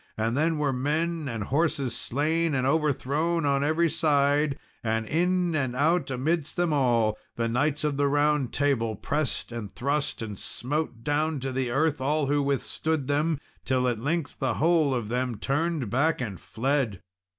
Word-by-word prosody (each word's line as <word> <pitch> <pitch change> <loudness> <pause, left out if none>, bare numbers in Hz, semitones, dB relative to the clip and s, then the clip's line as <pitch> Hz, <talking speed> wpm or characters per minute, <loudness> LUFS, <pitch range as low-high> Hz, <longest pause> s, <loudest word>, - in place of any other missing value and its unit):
And 115 +2 0
then 160 +3 +2
were 145 -2 +1
men 155 +4 -1
and 115 -3 -3
horses 140 -1 0
slain 155 +5 0
and 130 -1 +1
overthrown 150 +3 +1
on 140 0 +2
every 160 +3 +2
side, 145 -2 +2 0.3
and 110 0 0
in 175 +4 +1
and 130 -4 -1
out 160 +6 +2
amidst 145 +4 -1
them 175 -3 +1
all, 120 -6 +2 0.2
the 115 0 0
knights 140 +6 0
of 150 -2 0
the 145 0 +3
Round 145 -2 +2
Table 125 -6 +1
pressed 145 +3 -2
and 115 -4 -5
thrust, 140 -2 -1
and 105 -3 -6
smote 130 -3 -3
down 150 +2 0
to 135 0 -2
the 130 -1 -1
earth 145 +3 +1
all 150 +2 +1
who 145 +1 +2
withstood 140 +2 -1
them, 150 +2 +1 0.2
till 130 -1 +1
at 120 -3 0
length 155 +2 -2
the 130 -4 0
whole 160 -4 +3
of 115 -4 -3
them 125 -1 -1
turned 145 0 -1
back 150 +6 +2
and 105 -8 -4
fled. 125 -5 -1
140 Hz, 170 wpm, -27 LUFS, 125-155 Hz, 0.3 s, the